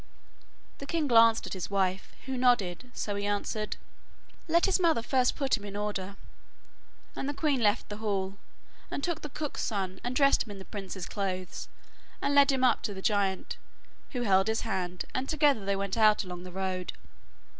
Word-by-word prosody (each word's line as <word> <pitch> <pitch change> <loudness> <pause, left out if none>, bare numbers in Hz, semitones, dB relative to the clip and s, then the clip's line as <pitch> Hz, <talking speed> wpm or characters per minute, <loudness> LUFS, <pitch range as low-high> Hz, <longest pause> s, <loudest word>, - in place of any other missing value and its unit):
The 280 - -7
king 325 -1 0
glanced 230 -2 +6
at - - -5
his 185 -2 -4
wife, 190 -1 0
who 265 0 -3
nodded, 245 -4 +2
so 210 - -3
he 200 0 -2
answered: 210 +1 -2 0.7
'Let 335 +1 +4
his 390 -1 +2
mother 325 -10 +3
first 255 0 +2
put 275 -2 +2
him 205 - -8
in 200 -1 -7
order,' 200 -2 -3 1.0
and 270 - -3
the 290 - -3
queen 285 -4 +1
left 210 0 +2
the 205 - -6
hall, 200 -2 -2 0.5
and 280 - -4
took 345 -3 -1
the 300 - -6
cook's 295 +1 -4
son 190 -4 -2
and 245 +1 -2
dressed 275 +1 +5
him - - -3
in - - -9
the 190 - -10
prince's 195 -3 -6
clothes, 185 -3 -4 0.5
and 280 - 0
led 280 0 +6
him 265 -1 0
up 255 - +4
to 205 -3 -3
the 190 - -6
giant, 200 -4 0 0.6
who 245 -2 -1
held 195 -2 +4
his 220 0 +1
hand, 180 -4 -3
and 260 +1 -2
together 290 -8 +3
they 200 0 0
went 195 -1 -2
out 215 -1 +5
along 180 -1 -7
the 180 - -8
road. 185 -1 -3
210 Hz, 190 wpm, -29 LUFS, 190-260 Hz, 1.0 s, glanced